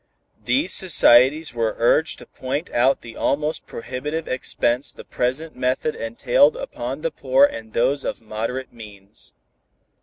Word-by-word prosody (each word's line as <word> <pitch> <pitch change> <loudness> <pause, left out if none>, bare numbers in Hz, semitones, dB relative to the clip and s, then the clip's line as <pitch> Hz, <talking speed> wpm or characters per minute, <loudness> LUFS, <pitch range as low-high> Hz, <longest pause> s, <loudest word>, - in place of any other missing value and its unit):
These 280 +5 +1
societies 150 -4 +4
were 115 -2 -1
urged 150 +7 +2
to - - -12
point 140 +6 -5
out 130 +3 +2
the 115 -1 -11
almost 150 +3 -1
prohibitive 145 +7 -5
expense 130 0 -1
the - - -12
present 135 +6 -3
method 130 +4 -1
entailed 120 +5 +2
upon 125 +4 -5
the 165 0 -1
poor 135 +1 +4
and 110 -5 -6
those 140 +4 +1
of - - -4
moderate 115 +4 -5
means. 105 -3 -12
130 Hz, 140 wpm, -22 LUFS, 115-150 Hz, -, societies